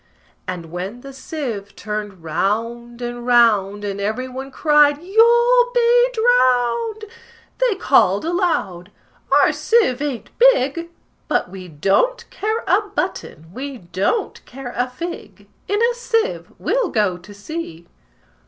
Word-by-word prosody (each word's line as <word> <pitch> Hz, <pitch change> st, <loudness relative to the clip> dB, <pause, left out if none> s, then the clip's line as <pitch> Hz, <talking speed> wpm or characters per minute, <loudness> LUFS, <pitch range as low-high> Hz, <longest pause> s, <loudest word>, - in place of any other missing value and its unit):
And 170 Hz, -3 st, -6 dB
when 190 Hz, +7 st, -6 dB
the 275 Hz, +1 st, -10 dB
sieve 255 Hz, -8 st, -6 dB
turned 210 Hz, -4 st, -6 dB
round 230 Hz, +8 st, -2 dB
and 240 Hz, 0 st, -5 dB
round, 215 Hz, -5 st, +3 dB
And 200 Hz, 0 st, -4 dB
every 220 Hz, +6 st, -2 dB
one 260 Hz, +1 st, -7 dB
cried, 295 Hz, 0 st, +3 dB
"You'll 385 Hz, +7 st, +2 dB
all 480 Hz, +1 st, +4 dB
be 485 Hz, +1 st, +4 dB
drowned!" 445 Hz, -, +2 dB, 0.5 s
They -, -, +2 dB
called 235 Hz, -, +3 dB
aloud, 320 Hz, -, -1 dB, 0.4 s
"Our -, -, +5 dB
sieve 420 Hz, -, +2 dB
ain't 285 Hz, -5 st, -4 dB
big; 335 Hz, -, +3 dB, 0.4 s
But -, -, 0 dB
we 185 Hz, -1 st, -9 dB
don't 195 Hz, -, 0 dB
care 435 Hz, +3 st, -2 dB
a -, -, +4 dB
button, 160 Hz, +3 st, -4 dB
we 275 Hz, +2 st, -6 dB
don't 185 Hz, -, -2 dB
care 255 Hz, -1 st, -8 dB
a 245 Hz, +1 st, -1 dB
fig: 340 Hz, +7 st, -8 dB, 0.2 s
In 410 Hz, +1 st, 0 dB
a 470 Hz, +1 st, +3 dB
sieve 475 Hz, -1 st, -2 dB
we'll -, -, 0 dB
go 205 Hz, -5 st, 0 dB
to 180 Hz, +4 st, -15 dB
sea!" 205 Hz, -, -7 dB
255 Hz, 135 wpm, -20 LUFS, -, 0.5 s, Our